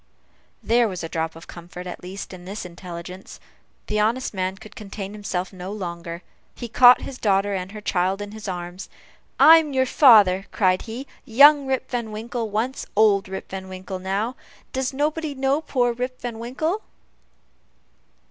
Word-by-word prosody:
There 235 0 +3
was 185 -4 -5
a 165 - -4
drop 160 0 -2
of 165 - -11
comfort, 175 +1 -10
at 180 - -7
least, 190 +2 -7
in 180 -1 -11
this 195 +1 -6
intelligence. 180 +1 -9 0.5
The 210 - -1
honest 230 +4 0
man 190 0 -2
could 215 +1 -14
contain 200 -1 -7
himself 195 -3 -4
no 185 +1 -7
longer. 170 -3 -6 0.3
He 240 - -6
caught 245 +2 +7
his 260 - -7
daughter 200 -1 +2
and 185 0 -4
her 215 0 -8
child 190 -1 0
in 205 0 -6
his 215 -1 -8
arms. 175 0 -6 0.5
"I 325 +1 +10
am 305 -3 -4
your 260 0 +3
father!" 210 -9 +6
cried 185 -3 +2
he 245 +5 -6 0.2
"Young 280 +4 +6
Rip 260 -1 -2
Van 235 -3 -2
Winkle 225 +1 -4
once 230 +6 -2
old 205 -3 +4
Rip 190 - -7
Van 190 0 -6
Winkle 185 0 -6
now 200 +6 -2 0.4
Does 260 0 -1
nobody 300 +2 -1
know 270 +3 +1
poor 245 -6 +1
Rip 250 +2 -4
Van 235 -2 -5
Winkle!" 310 - -2
210 Hz, 170 wpm, -23 LUFS, 185-250 Hz, 0.5 s, I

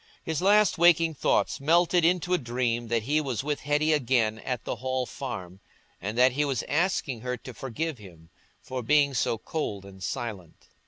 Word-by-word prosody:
His 160 -1 -2
last 205 -1 +4
waking 165 -1 +5
thoughts 145 - +1
melted 170 +4 +3
into 180 +1 +2
a 180 - +3
dream 120 -1 -1
that 115 -1 0
he 150 +6 +1
was 130 -5 -3
with 145 0 -2
Hetty 150 +2 +1
again 120 -6 +1
at 125 0 -4
the - - -4
Hall 130 0 -2
Farm, 95 -10 -7 0.4
and 105 +5 -4
that 125 +1 +6
he 145 +4 0
was 135 -5 -1
asking 150 -7 -1
her 125 +1 -3
to 130 - -10
forgive 135 +4 -4
him 85 -5 -15 0.3
for 130 -1 -4
being 140 +2 +3
so 115 -2 0
cold 105 -7 -4
and 95 -1 -13
silent. 100 -7 -6
130 Hz, 180 wpm, -27 LUFS, 115-155 Hz, 0.4 s, that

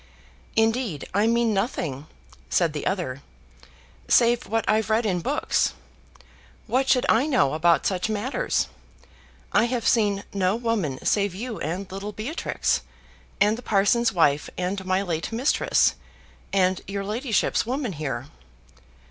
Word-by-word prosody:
"Indeed 225 - 0
I 205 +2 +3
mean 235 -1 +2
nothing," 160 - -2 0.4
said 170 -4 +2
the 150 - -3
other, 170 -9 -2 0.9
"save 235 0 +4
what 225 +2 0
I've 220 0 +2
read 220 +2 +2
in 185 -4 +1
books. 165 - 0 0.9
What 260 +4 0
should 255 -2 +4
I 245 +7 +3
know 250 - +2
about 165 +2 +3
such 185 +2 0
matters? 250 - -1 0.9
I - - +4
have 240 -1 -1
seen 205 -3 +2
no 190 0 +1
woman 225 - -2
save 200 -3 +1
you 230 +2 -5
and 180 +6 -4
little 200 +2 -5
Beatrix, 245 +11 -1 0.6
and 210 +3 +3
the - - -8
parson's 225 +2 +2
wife 150 -6 +2
and 185 +2 -2
my 185 +1 +1
late 170 -1 -3
mistress, 245 +6 +2 0.6
and 185 -1 +2
your 195 0 -3
ladyship's 225 +1 0
woman 255 -4 -2
here." 140 -5 -4
205 Hz, 135 wpm, -25 LUFS, 180-230 Hz, 0.9 s, save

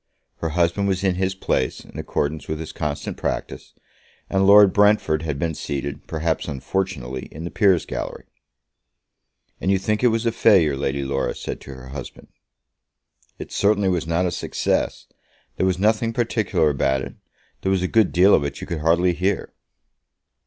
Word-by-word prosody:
Her 80 - -3
husband 85 +4 +2
was 95 -1 -1
in 95 -2 +2
his 95 +1 -1
place, 65 -8 -1
in - - -11
accordance 75 0 -2
with 80 0 -3
his 80 - -6
constant 75 -2 -4
practice, - - -4 0.6
and 95 0 +3
Lord 100 -1 +8
Brentford 105 -7 +3
had 75 -3 -3
been 80 +3 -1
seated, 70 -1 -5
perhaps 80 0 -2
unfortunately, 70 -3 -3
in 80 - -9
the 85 - -5
peers' 95 -6 +3
gallery. - - -5 1.4
"And 95 - -1
you 95 - +4
think 105 +4 -1
it - - +6
was 115 0 0
a 115 - +2
failure?" 95 -10 +4
Lady 70 0 -2
Laura 70 0 -1
said - - -6
to 70 - -10
her 65 0 -11
husband. 70 -1 -9 1.1
"It - - -8
certainly 100 -1 +2
was 85 -3 -1
not 85 +2 +1
a 90 - 0
success. - - -1 0.5
There 95 - +2
was 90 -1 +1
nothing 110 +3 +1
particular 105 -9 +1
about 65 -1 0
it. - - -7 0.5
There 95 - 0
was 95 -1 +1
a - - +1
good 110 +1 +3
deal 95 +3 +5
of 75 - +4
it 70 -1 -4
you - - -6
could 85 -3 -4
hardly 85 +3 +3
hear." 95 +2 -1
85 Hz, 175 wpm, -22 LUFS, 75-100 Hz, 1.4 s, Lord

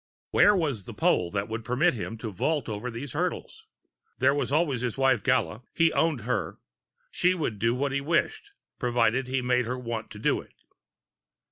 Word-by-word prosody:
Where 205 - +6
was 145 - -1
the - - -9
pole 90 - +2
which 100 +2 -2
would 110 +1 -5
permit 125 +10 +2
him 115 -1 -5
to 110 -1 -5
vault 145 - -1
over 110 +3 -4
these 120 +3 -6
hurdles? - - -3 0.5
There 130 +2 +4
was 145 - -1
always 145 -5 +1
his 125 -1 -2
wife, 135 -4 +3
Gala. 85 +6 +1
He 165 -1 +3
owned 160 -7 +1
her; 125 +4 -2 0.5
she 180 +1 +2
would 115 - -3
do 115 +3 +2
what 140 +2 -1
he 140 0 -1
wished 290 - 0 0.3
provided 120 +1 +1
he 130 0 -1
made 125 0 +2
her 125 +2 -3
want 115 -3 -5
to 105 - -10
do 105 - +1
it. - - -21
125 Hz, 190 wpm, -27 LUFS, 115-145 Hz, 0.5 s, Where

